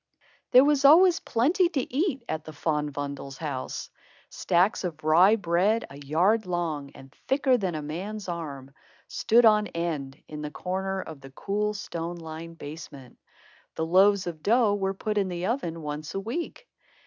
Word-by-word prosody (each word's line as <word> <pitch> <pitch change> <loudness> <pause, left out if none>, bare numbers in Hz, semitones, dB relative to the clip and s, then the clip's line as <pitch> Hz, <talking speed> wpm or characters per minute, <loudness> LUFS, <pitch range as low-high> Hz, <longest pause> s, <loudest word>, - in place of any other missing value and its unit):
There 255 +2 +7
was 290 -1 +2
always 345 +5 +7
plenty 340 +7 +2
to 270 -7 -3
eat 280 -3 0
at 155 -1 -3
the 155 - -9
Van 150 -1 -1
Bommels' 140 -1 -6
house. 145 -5 -5 0.4
Stacks 180 +4 +1
of 155 -4 -5
rye 175 +7 +6
bread, 200 +3 +1
a 140 - -10
yard 185 +9 +2
long 165 -5 -2
and 135 0 -14
thicker 270 -1 +3
than 190 -8 -1
a 155 - -4
man's 190 +7 -5
arm, 140 -6 -6 0.3
stood 235 +2 +3
on 210 -1 +5
end 150 -5 -4
in 150 -1 -7
the 150 - -4
corner 190 +4 -3
of 155 -4 -10
the 135 - -11
cool, 210 +9 -2
stone 170 -3 -5
lined 165 0 -9
basement. 145 -4 -10 0.6
The 160 - -1
loaves 190 +3 +4
of 165 -3 -6
dough 225 +1 +3
were 195 -1 -1
put 210 +1 -1
in 195 - 0
the 175 -1 -4
oven 170 - -2
once 150 +2 -5
a - - 0
week. 325 - -5
175 Hz, 170 wpm, -27 LUFS, 155-215 Hz, 0.6 s, There